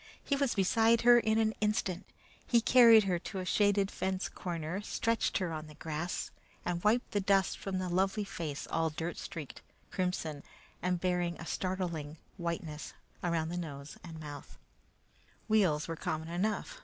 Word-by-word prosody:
He 285 - +1
was 275 -2 +1
beside 225 +3 +4
her 240 0 +8
in 220 -1 +1
an 220 -1 +2
instant. 210 -4 0 0.4
He 235 - +5
carried 230 -2 +7
her 180 -3 0
to 190 +3 -7
a 185 - -3
shaded 205 0 +2
fence 190 0 -2
corner, 170 +1 -4
stretched 230 +2 0
her 180 -4 -2
on 155 0 -5
the 150 - -13
grass, 160 +3 -3 0.3
and 175 -1 -2
wiped 225 +4 +2
the 205 - +1
dust 195 0 +2
from 195 -1 -3
the 185 0 -2
lovely 190 +4 +1
face 165 -7 -5
all 165 0 0
dirt 165 +2 -4
streaked, 155 -5 -7 0.3
crimson, 180 -6 -2 0.4
and 180 0 0
bearing 175 -1 0
a 160 - -7
startling 170 -5 -3 0.2
whiteness 170 -3 -4 0.3
around 165 -2 0
the 175 +1 -3
mouth 145 -4 -7
and 165 -2 -8
nose. 145 -2 -9 0.9
Wheels 190 -9 +3
were 165 - -3
common 160 -1 -3
enough. 210 - -2
180 Hz, 165 wpm, -32 LUFS, 165-205 Hz, 0.9 s, her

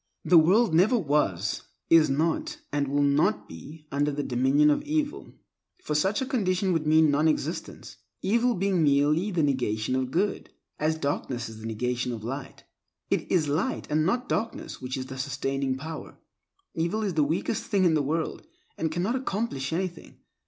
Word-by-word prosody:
The 175 - +7
world 195 +5 +4
never 195 +9 +4
was, 140 - 0 0.3
is 165 -2 +6
not, 155 +4 0
and 145 -1 0
will 145 +1 +1
not 140 -7 +2
be, 150 - -11
under 145 +1 +1
the 145 0 -2
dominion 135 +4 +3
of - - +1
evil, 300 0 -3 0.5
for - - -2
such 190 - +1
a - - -3
condition 195 -7 0
would 160 -2 -1
mean 155 -1 +5
non 150 +3 +3
existence, 155 - -3 0.3
evil 235 +5 +2
being 190 -1 +1
merely 150 +5 +3
the 175 -5 0
negation 125 -4 0
of 130 -1 -1
good, 195 +9 -1 0.3
as 155 +1 +1
darkness 130 -5 -3
is 110 -1 -10
the 110 - -6
negation 125 +2 -2
of 110 -2 -7
light. 135 +3 -6 0.5
It - - -1
is 165 -5 +2
light, 165 - -1
and 155 +1 +2
not 240 +9 0
darkness 225 -9 -3
which 130 +1 -4
is 130 - -4
the 130 0 -8
sustaining 135 -1 -2
power. 155 +4 -8 0.6
Evil 170 +7 -1
is 195 -3 -1
the 155 -2 +3
weakest 160 +8 -1
thing 195 -3 +2
in 170 - +4
the 155 - +2
world, 160 - -2 0.3
and 160 -1 -1
cannot 180 +9 -1
accomplish 210 - -2
anything. 175 +1 -4
155 Hz, 175 wpm, -27 LUFS, 135-185 Hz, 0.6 s, The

